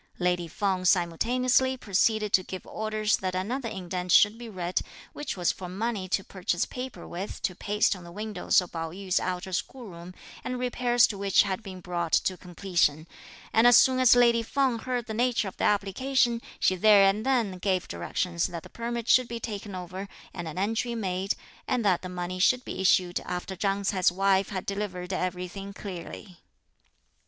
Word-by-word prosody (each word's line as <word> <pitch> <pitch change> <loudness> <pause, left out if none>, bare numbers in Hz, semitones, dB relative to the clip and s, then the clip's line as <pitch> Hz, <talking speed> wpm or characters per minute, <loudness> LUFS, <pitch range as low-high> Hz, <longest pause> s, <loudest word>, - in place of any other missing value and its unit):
Lady 180 -1 0
Feng 185 +2 -1
simultaneously 245 +9 +2
proceeded 210 0 +1
to 185 - +6
give 185 0 -8
orders 215 -1 0
that 185 -1 -3
another 230 +7 -2
indent 180 -2 -4
should 205 +4 +6
be 235 0 -9
read, 180 -3 -2 0.3
which 295 - -5
was 175 -1 +2
for 180 -2 -8
money 200 0 -3
to 195 - 0
purchase 180 -2 -2
paper 255 0 -7
with 190 +4 -6
to 185 - 0
paste 205 +3 +1
on 180 - -11
the 170 - -11
windows 210 0 +1
of 180 - -9
Pao 165 -1 -4
yü's 185 +2 -1
outer 185 +1 -3
school 240 +5 -4
room, 170 +1 -11 0.3
the 255 - -3
repairs 245 -1 +3
to 200 - -4
which 195 -1 +4
had 195 0 -3
been 185 -3 -9
brought 175 -2 -3
to 185 - +2
completion, 175 -4 0 0.5
and 225 +2 +6
as 245 - +8
soon 260 -1 +5
as 255 -1 +7
lady 235 -1 +5
Feng 255 0 0
heard 245 -1 -3
the 220 - -5
nature 240 -2 +1
of 190 - -8
the - - 0
application, 235 +4 +1 0.2
she 185 - +3
there 205 +1 +6
and 205 +3 +1
then 230 -8 0
gave 185 -1 0
directions 170 -3 -2
that 170 -2 -7
the - - -12
permit 235 0 -4
should 255 -1 +5
be 235 0 -5
taken 205 -3 -6
over 185 +2 -6 0.3
and 175 -2 -6
an 160 - -7
entry 225 +5 -1
made, 190 -2 -1 0.3
and 250 -4 0
that 185 -3 +3
the 185 - -6
money 180 0 -4
should 250 +7 +3
be - - -5
issued 180 -1 +3
after 180 +1 -5
Chang 195 +1 -1
Ts'ai's 190 -3 +2
wife 195 +1 +2
had 190 -2 -4
delivered 195 -2 -4
everything 185 +2 -4
clearly. 185 -2 -8
195 Hz, 185 wpm, -27 LUFS, 180-230 Hz, 0.5 s, as